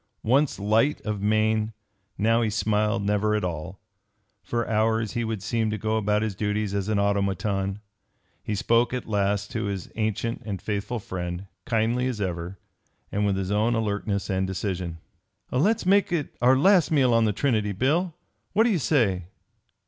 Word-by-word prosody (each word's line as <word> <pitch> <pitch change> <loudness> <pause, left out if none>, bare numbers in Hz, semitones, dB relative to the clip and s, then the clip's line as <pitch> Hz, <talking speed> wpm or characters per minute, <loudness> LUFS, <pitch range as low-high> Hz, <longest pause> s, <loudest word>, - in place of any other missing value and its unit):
Once 135 +5 +2
light 110 +8 +2
of 105 -2 -3
mien, 110 +1 +1 0.4
now 115 +2 +3
he 110 - +1
smiled 105 0 +1
never 105 +1 +1
at 105 - -1
all. 90 +2 -4 0.6
For 120 -1 -2
hours 110 0 +1
he 120 - -1
would 110 -4 -3
seem 110 0 0
to 105 - -2
go 110 +2 -1
about 105 0 +1
his 110 -2 -1
duties 105 +1 -1
as 100 0 -1
an 110 - +1
automaton. 100 -1 0 0.6
He 105 - -3
spoke 115 +4 +2
at 125 - -5
last 100 -1 0
to - - -2
his 100 -3 -4
ancient 110 +2 -2
and 100 -4 -4
faithful 105 +5 -3
friend, 90 -2 -5 0.2
kindly 120 +2 +1
as 125 -4 -3
ever, 90 -1 -3 0.5
and 105 0 +1
with 100 -1 +1
his 95 0 -2
own 110 +3 +2
alertness 100 -2 -1
and 95 0 0
decision. 90 -3 -3 0.5
"Let's 200 - +2
make 195 0 +4
it 160 -5 -2
our 130 +2 +5
last 185 +4 +5
meal 135 -6 +3
on 115 -1 +4
the 105 - +2
Trinity, 110 -2 0
Bill. 155 - 0 0.4
What 215 +3 +5
do 235 - +3
you 185 - +1
say?" 110 - +1
110 Hz, 170 wpm, -25 LUFS, 100-115 Hz, 0.6 s, our